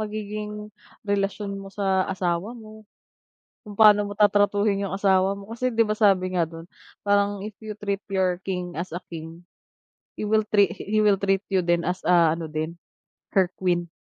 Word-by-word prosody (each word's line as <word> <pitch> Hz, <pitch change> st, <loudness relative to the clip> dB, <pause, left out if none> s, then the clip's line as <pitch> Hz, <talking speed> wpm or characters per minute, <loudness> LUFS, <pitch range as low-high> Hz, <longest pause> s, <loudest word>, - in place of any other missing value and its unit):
magiging 210 Hz, 0 st, -4 dB, 0.5 s
relasyon 200 Hz, 0 st, -1 dB
mo 195 Hz, -, -9 dB
sa 195 Hz, -2 st, 0 dB
asawa 190 Hz, +4 st, -2 dB
mo, 215 Hz, -1 st, -13 dB, 0.8 s
kung 210 Hz, -, -9 dB
paano 210 Hz, -1 st, +7 dB
mo 205 Hz, -, -5 dB
tatratuhin 205 Hz, 0 st, +2 dB
yung 190 Hz, -, -4 dB
asawa 195 Hz, -1 st, +2 dB
mo. 200 Hz, 0 st, -9 dB
Kasi, 255 Hz, +2 st, -1 dB
di 230 Hz, -, -1 dB
ba, 215 Hz, -1 st, +2 dB
sabi 185 Hz, -3 st, +3 dB
nga 170 Hz, -, +3 dB
dun, 165 Hz, +1 st, -11 dB, 0.3 s
parang, 200 Hz, 0 st, +1 dB
"If 215 Hz, -, -6 dB
you 215 Hz, -, -4 dB
treat 200 Hz, -1 st, -2 dB
your 185 Hz, -2 st, +1 dB
king 180 Hz, -3 st, -4 dB
as 170 Hz, 0 st, -5 dB
a 175 Hz, -, -4 dB
king, 165 Hz, 0 st, -8 dB, 0.8 s
he -, -, -5 dB
will 215 Hz, 0 st, +1 dB
trea 200 Hz, -4 st, +3 dB
he 215 Hz, +4 st, -1 dB
will 200 Hz, -2 st, +4 dB
treat 195 Hz, 0 st, +1 dB
you," 190 Hz, -, +3 dB
din 170 Hz, 0 st, +1 dB
"as," 180 Hz, +1 st, -2 dB
ah, 170 Hz, -3 st, +5 dB
ano 165 Hz, 0 st, -3 dB
din, 155 Hz, +2 st, -4 dB, 0.6 s
"her 185 Hz, -2 st, +3 dB
queen." 175 Hz, -2 st, 0 dB
195 Hz, 180 wpm, -24 LUFS, 180-210 Hz, 0.8 s, paano